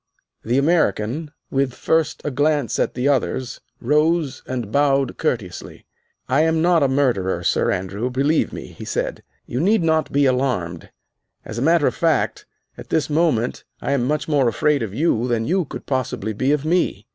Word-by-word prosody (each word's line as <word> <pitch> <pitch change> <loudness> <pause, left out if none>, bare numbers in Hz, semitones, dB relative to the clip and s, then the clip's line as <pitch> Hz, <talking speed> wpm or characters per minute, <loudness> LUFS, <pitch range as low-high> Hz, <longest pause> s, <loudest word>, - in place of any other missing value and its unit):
The 120 +3 0
American, 140 - +1 0.2
with 135 -2 0
first 160 -1 0
a 150 - -1
glance 145 -3 +1
at - - 0
the 125 +2 0
others, 130 -2 -1 0.2
rose 150 +2 +1
and 120 -5 -4
bowed 140 -1 +2
courteously. 110 - -3 0.4
"I 130 +4 +3
am 160 0 +2
not 170 0 +3
a 140 - +4
murderer, 115 -10 0
Sir - - +1
Andrew, 100 +6 -2
believe 140 +5 +1
me," - - -7
he - - -11
said; - - -3 0.2
"you 125 - -3
need 195 +4 +3
not 160 -2 +1
be 140 0 +3
alarmed. 125 -11 -1 0.6
As 110 - -5
a - - -3
matter 165 +1 +3
of - - +2
fact, 165 -3 0 0.3
at - - -10
this 155 -1 0
moment 150 -7 +1 0.2
I - - -3
am 135 -3 +1
much 145 0 -1
more 145 -5 +2
afraid 145 +5 +1
of 110 -4 -3
you 125 - +1
than 115 -2 0
you 180 +3 +1
could - - -8
possibly 125 -5 -2
be 130 +6 0
of 150 0 0
me. 160 - 0
135 Hz, 180 wpm, -21 LUFS, 120-155 Hz, 0.6 s, a